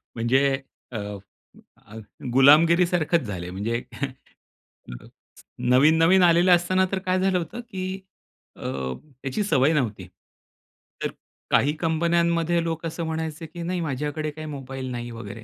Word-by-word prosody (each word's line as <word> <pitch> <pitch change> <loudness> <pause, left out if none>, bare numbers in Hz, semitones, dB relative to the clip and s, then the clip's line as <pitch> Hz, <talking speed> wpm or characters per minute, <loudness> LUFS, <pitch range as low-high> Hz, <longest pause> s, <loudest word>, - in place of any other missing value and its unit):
म्हणजे 135 +4 +2 0.3
अ, 115 - -4 0.8
अ, 110 - -14 0.4
गुलामगिरी 155 +7 +6
सारखंच 170 -1 +1
झाले 90 -4 -5
आहे. - - -7
म्हणजे 115 +6 -2 1.9
नवीन-नवीन 165 +7 +5
आलेलं 175 +1 +5
असताना, 185 +2 +2
तर 195 - 0
काय 185 0 0
झालं 190 0 +2
होतं 180 +7 -5
की 190 -2 -4 0.6
अ, - - -7 0.6
याची 135 +10 -1
सवय 150 -5 +3
नव्हती. 105 - -1 1.0
तर - - 0 0.4
काही 145 +2 +3
कंपन्यांमध्ये 170 +1 +1
लोक 165 0 -3
असं 165 +1 -4
म्हणायचे, 160 0 -4
"की 170 +2 -9
नाही 180 +1 -2
माझ्याकडे 150 +1 -3
काही 155 +1 -8
मोबाईल 135 -2 -6
नाही" 120 -1 -5
वगैरे. 115 -1 -8
160 Hz, 130 wpm, -24 LUFS, 135-170 Hz, 1.9 s, गुलामगिरी